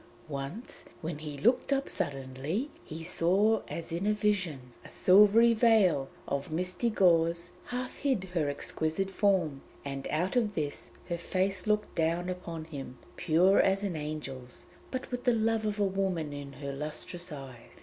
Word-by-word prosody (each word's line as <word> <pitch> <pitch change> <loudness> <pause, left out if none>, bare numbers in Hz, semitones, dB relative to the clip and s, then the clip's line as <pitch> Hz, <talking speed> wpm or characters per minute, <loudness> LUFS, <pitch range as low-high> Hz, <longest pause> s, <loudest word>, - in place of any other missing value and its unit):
Once 140 - -6 0.2
when 155 -2 -4
he 150 -2 -6
looked 245 - +2
up 275 0 +1
suddenly 145 - -2
he 160 +1 -7
saw 185 +6 +3
her - - -14
as 170 0 -6
in 175 +5 -1
a 210 - +4
vision. 185 - -1
A - - -12
silvery 210 +5 +6
veil 215 - +4 0.2
of 140 +2 -2
misty 180 +8 0
gauze 170 -4 +3
half 250 +1 -4
hid 265 -9 0
her 155 -5 +1
exquisite 160 +6 -2
form; 180 -9 +1 0.2
and 135 -1 -4
out 175 +7 -1
of 220 -5 +1
this 150 -3 -3 0.2
her 170 -1 -2
face 185 +2 -1
looked 210 0 +1
down 170 +2 0
upon 170 -3 -5
him, 135 -5 -8 0.2
pure 180 +3 +4
as 195 +1 +2
an 195 -4 -2
angel's, 150 -5 -6 0.2
but 255 0 -5
with 245 0 -3
the 245 -2 +3
love 225 0 +1
of 210 0 -2
a - - +3
woman 190 -6 -1
in 140 -1 -7
her 140 +1 -5
lustrous 155 +4 -5
eyes. 135 -5 -10
175 Hz, 165 wpm, -30 LUFS, 150-205 Hz, 0.2 s, silvery